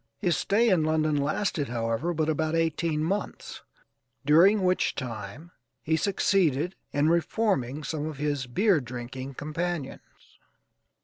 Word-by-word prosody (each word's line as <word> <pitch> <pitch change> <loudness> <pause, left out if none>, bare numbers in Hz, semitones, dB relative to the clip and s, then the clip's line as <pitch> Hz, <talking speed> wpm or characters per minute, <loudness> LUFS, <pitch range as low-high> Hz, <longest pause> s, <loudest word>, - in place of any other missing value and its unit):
His 175 -6 +1
stay 230 +4 +2
in 180 -6 +3
London 155 -1 +1
lasted, 145 +1 -1
however, 115 +7 -1
but 155 -2 -1
about 155 +1 0
eighteen 165 -1 0
months, 195 +5 -4 0.6
during 185 +8 +5
which 185 0 +1
time 120 - -7 0.3
he 160 - +1
succeeded 180 -3 +1 0.2
in 145 +1 +2
reforming 165 - 0
some 155 -1 -3
of 155 -3 -6
his 145 -3 -2
beer 185 - +2
drinking 130 +2 -7
companions. 155 0 -6
155 Hz, 125 wpm, -27 LUFS, 140-175 Hz, 0.6 s, during